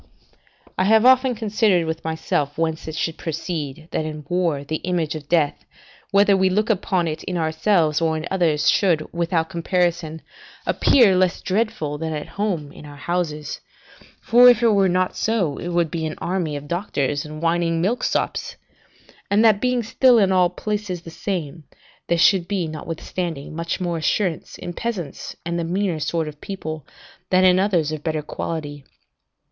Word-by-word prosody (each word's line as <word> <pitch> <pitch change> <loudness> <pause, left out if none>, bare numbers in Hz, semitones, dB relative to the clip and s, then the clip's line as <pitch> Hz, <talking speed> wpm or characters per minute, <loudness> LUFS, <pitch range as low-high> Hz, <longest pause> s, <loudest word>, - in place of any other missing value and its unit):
I 185 - +3
have 220 +3 +5
often 255 -1 +5
considered 210 -5 +1
with 160 0 -4
myself 160 -3 -2
whence 160 -1 -2
it 160 - -5
should 165 0 -2
proceed, 160 -2 -4
that - - -1
in 155 -1 -6
war 170 -5 0
the 155 +2 -3
image 170 -4 -2
of 150 -2 -8
death, 160 -4 +1 0.5
whether 200 0 +4
we 190 0 +3
look 210 +4 +1
upon 185 -3 0
it 155 -1 -4
in 180 - -2
ourselves 160 -1 +1
or 160 -1 +1
in 155 - -5
others, 160 -6 +1
should, 170 -6 +2
without 170 -1 0
comparison, 170 -2 -1 0.4
appear 225 -8 +4
less 185 0 +2
dreadful 185 -8 -1
than 160 0 -3
at 150 -1 -5
home 180 -8 -2
in - - -13
our 145 -1 -10
own - - -13
houses 155 -2 -3 0.6
(for 245 +2 +7
if 240 -1 +4
it 230 - +5
were 200 -3 +3
not 185 +1 0
so, 195 -11 0
it - - -5
would 170 -2 0
be 160 -2 -2
an 155 - -5
army 175 -4 -2
of 145 0 -7
doctors 145 -5 -1
and 155 0 -8
whining 165 0 +1
milksops), 205 +9 -1 0.7
and 210 +3 +4
that 215 -3 +4
being 250 -1 +1
still 250 +1 +4
in 195 -3 +4
all 180 -2 +4
places 200 -2 -4
the 165 - -9
same, 165 -4 -4 0.4
there 170 - +2
should 175 +1 +4
be, 190 -4 -1
notwithstanding, 160 0 -5
much 170 +2 -3
more 175 -2 -2
assurance 165 +1 -1
in 175 - -6
peasants 200 -7 -5
and 170 0 -2
the - - -1
meaner 180 0 -1
sort 160 +2 -1
of 150 -1 -9
people, 155 -6 -6 0.4
than 185 0 +4
in 185 0 +5
others 175 -6 +1
of 155 -2 -4
better 155 -2 -2
quality. 145 -3 -5
170 Hz, 175 wpm, -22 LUFS, 155-195 Hz, 0.7 s, for